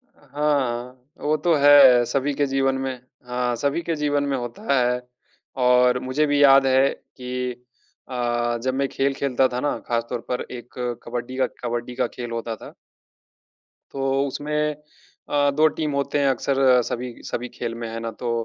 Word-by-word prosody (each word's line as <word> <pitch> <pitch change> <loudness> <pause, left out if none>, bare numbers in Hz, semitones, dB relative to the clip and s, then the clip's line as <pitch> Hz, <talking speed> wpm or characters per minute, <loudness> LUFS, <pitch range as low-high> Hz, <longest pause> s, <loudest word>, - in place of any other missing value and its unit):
हाँ, 135 -4 -2 0.2
वो 150 +1 +1
तो 170 +1 +2
है 140 -4 +8
सभी 140 +4 -1
के 145 +1 +1
जीवन 135 0 +1
में 135 0 -2 0.3
हाँ, 125 0 -1
सभी 140 +7 -1
के 165 -1 -2
जीवन 145 -1 0
में 140 -1 -1
होता 120 +3 -3
है। 125 -1 +2 0.6
और 125 0 +4
मुझे 130 +4 0
भी 145 0 +2
याद 135 -1 +7
है 130 +1 +4 0.3
कि 125 -1 -4 0.5
अ, 120 -1 -1
जब 130 0 0
मैं 135 +1 0
खेल 135 0 0
खेलता 135 -1 +1
था 125 - -1
ना 145 +2 -1
ख़ासतौर 120 +1 -2
पर 125 - -1
एक 120 -1 -9 0.3
कबड्डी 120 +2 -5
का 130 -1 +2 0.2
कबड्डी 120 +1 -3
का - - 0
खेल 120 -1 -7
होता 115 -1 -3
था। - - -12 1.2
तो 135 0 0
उसमें 150 +2 -2 0.5
अ, 145 -1 +3
2 155 +3 +4
टीम 155 -2 -1
होते 140 +1 0
हैं 140 - +2
अक्सर 130 -1 +3
सभी 125 +1 -4
सभी 125 +1 -4
खेल 120 -2 -4
में 115 0 -5
है 115 0 -5
ना 115 0 -4
तो 120 - -3
130 Hz, 170 wpm, -23 LUFS, 125-140 Hz, 1.2 s, है